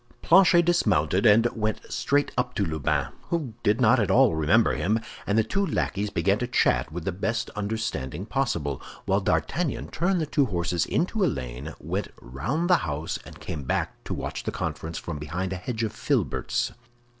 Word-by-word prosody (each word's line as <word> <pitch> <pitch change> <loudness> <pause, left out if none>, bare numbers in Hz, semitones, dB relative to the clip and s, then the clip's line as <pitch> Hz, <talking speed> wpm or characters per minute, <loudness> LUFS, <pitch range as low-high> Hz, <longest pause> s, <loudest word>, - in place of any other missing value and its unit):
Planchet 175 0 +6
dismounted 100 - +2
and 110 +2 +6
went 110 -1 -1
straight 145 +1 +1
up 125 0 -1
to 100 - +1
Lubin, 80 -3 0 0.2
who 155 -9 -2
did 105 0 +2
not 125 +1 +5
at 105 - +1
all 130 -5 +5
remember 80 +9 +3
him, 110 +5 +1 0.3
and 105 - +2
the 110 - +5
two 195 - 0
lackeys 105 - -1
began 100 +1 +1
to 125 - -1
chat 125 - +2
with 85 0 -6
the 95 - 0
best 110 +6 -2
understanding 100 - -3
possible; 85 - -1 0.2
while 95 +1 +2
D'Artagnan 155 - -1
turned 175 +3 +1
the 160 - 0
two 145 -2 +2
horses 85 -3 -1
into 195 +4 0
a - - +4
lane, 65 - -5
went - - -3
round 85 - -2
the 180 -1 +6
house, 75 - -3
and - - -12
came 75 - -5
back 65 - -2
to - - -3
watch - - -4
the - - -3
conference 80 +1 -4
from 75 - -5
behind 90 +6 -3
a - - -3
hedge 110 +5 -3
of 110 - -2
filberts. - - 0
110 Hz, 185 wpm, -26 LUFS, 85-135 Hz, 0.3 s, Planchet